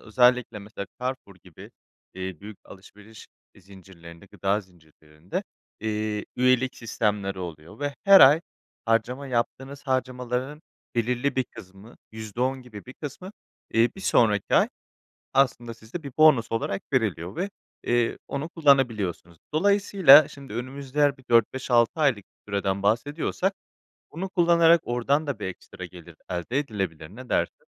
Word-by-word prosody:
özellikle, 125 0 +2
mesela, 100 -1 -8
Carrefour 125 -6 -4
gibi, 90 -4 -13 0.4
eee, 95 -2 -5
büyük 105 0 -10
alışveriş 105 +3 -14 0.3
zincirlerinde, 95 -2 -15
gıda 100 +2 -1
zincirlerinde, 80 -2 -9 0.4
eee, 105 -1 -2
üyelik 130 0 +2
sistemleri 105 -4 -2
oluyor 85 - -8
ve 145 -1 -2
her 195 0 +9
ay 145 +5 +8 0.4
harcama 120 +4 0
yaptığınız 135 +3 -3
harcamalarının 130 +2 -2 0.3
belirli 125 +3 0
bir 130 - +2
kısmı 100 0 -14 0.2
%10 125 +5 -3
gibi 110 -5 -11
bir 130 - -9
kısmı 180 +6 -8 0.4
bir, 115 - 0
eee, 120 - +4
1 - - -9
sonraki 105 - +2
ay - - +5 0.7
aslında 125 -3 +1
sizde 115 +9 -9
bir 140 - -7
bonus 150 -7 +5
olarak 110 -3 -2
veriliyor 95 -6 -1
ve, 195 +3 -2 0.3
eee, 120 -1 +1
onu 140 +4 -4
kullanabiliyorsunuz. 115 - +1 0.2
Dolayısıyla 190 -5 +6
şimdi 140 -6 -11
önümüzde 135 +3 -5
eğer 145 -1 +3
bir 130 - -20
4 115 -1 +4
5 130 -1 -6
6 120 -1 +5
aylık 140 -7 +3
bir 105 - -19
süreden 100 -1 -1
bahsediyorsak, 145 - 0 0.6
bunu 185 +4 -5
kullanarak 170 -2 +4
oradan 140 +5 0
da 135 -7 -3
bir - - -4
ekstra 90 0 -9
gelir 85 -2 -13
elde 90 +10 -2
edilebilir, 95 - -4
ne 130 0 -11
dersin? - - -1
120 Hz, 140 wpm, -25 LUFS, 100-140 Hz, 0.7 s, her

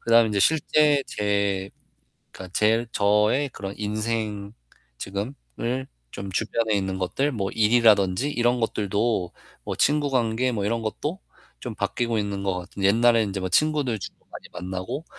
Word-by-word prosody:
그다음에 115 0 +5
인제 105 -1 -1
실제 150 -1 +3
제 100 -2 -1 0.6
그러니까 95 -1 -10
제 110 +2 +2
저의 105 +7 +2
그런 100 -4 -6
인생. 105 -1 -3 0.5
지금을 120 +5 -4 0.2
좀 100 0 -6
주변에 110 0 0
있는 95 -1 -1
것들 135 +11 0
뭐 100 -5 -2
일이라든지 110 +1 +3
이런 120 -2 +1
것들도 105 -3 0 0.3
뭐 - - -4
친구 145 0 +2
관계 125 0 +1
뭐 105 -4 -2
이런 115 +2 0
것도 150 - -3 0.4
좀 - - -6
바뀌고 115 -2 -1
있는 100 -1 -3
것 95 -2 -1
같은 95 +2 -8
옛날에 115 +3 +4
인제 100 -1 -3
뭐 95 - -1
친구들 145 - +1
주로 100 - -8
많이 - - -10
만나고 95 - -5
110 Hz, 305 characters per minute, -25 LUFS, 100-120 Hz, 0.6 s, 그다음에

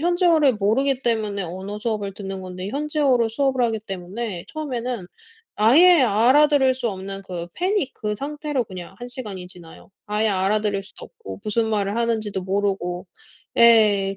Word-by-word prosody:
현지어를 335 -5 +3
모르기 250 +6 +1
때문에 215 -4 -1
언어 190 +4 -6
수업을 210 -3 -3
듣는 195 -1 -6
건데 185 +1 -6
현지어로 280 -5 +1
수업을 260 +2 0
하기 225 -1 -2
때문에 195 -1 -6
처음에는 250 - -4 0.5
아예 315 +11 +6
알아들을 260 +4 +4
수 250 -2 -2
없는 195 -1 -6
그 175 -2 -5
패닉 365 -6 -1
그 210 -1 -3
상태로 290 +1 -3
그냥 185 -3 -9
1 245 - -7
시간이 210 -8 -7
지나요. 175 +1 -15 0.2
아예 210 +1 0
알아들을 200 +1 0
수도 195 - -13
없고 95 -1 -10
무슨 220 +2 0
말을 210 -1 -1
하는지도 220 -4 -1
모르고 190 -2 -2 0.5
예. 210 -4 +5
215 Hz, 345 characters per minute, -22 LUFS, 195-260 Hz, 0.5 s, 아예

